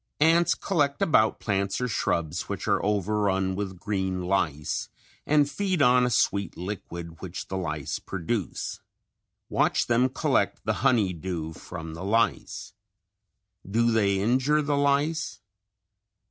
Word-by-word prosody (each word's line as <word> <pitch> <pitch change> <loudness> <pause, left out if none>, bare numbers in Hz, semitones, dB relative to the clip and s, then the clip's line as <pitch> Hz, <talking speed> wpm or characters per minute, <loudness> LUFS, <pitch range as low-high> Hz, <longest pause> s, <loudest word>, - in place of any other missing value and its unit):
Ants 165 +3 +4
collect 145 -7 0
about 110 -8 +3
plants 100 -2 -1
or 125 - 0
shrubs 85 -6 -1
which - - -4
are - - +2
overrun 100 -2 +1
with 95 -2 -4
green 95 -2 -2
lice, 85 -5 -1 0.4
and 145 -1 +4
feed 185 +5 -1
on 125 -2 +5
a - - 0
sweet 100 -4 +1
liquid 85 -3 -6
which 95 -1 -6
the 95 - -3
lice 75 -6 -3
produce. 95 - -3 0.7
Watch - - +2
them 120 +2 +3
collect - - 0
the - - +1
honey 105 -7 +3
dew 85 -2 -4
from 80 -1 -8
the 85 +3 -7
lice. 115 +4 0 1.0
Do 115 +3 +2
they 100 -3 +2
injure 130 +8 +2
the 145 0 0
lice? 145 +1 +1
105 Hz, 130 wpm, -26 LUFS, 90-130 Hz, 1.0 s, on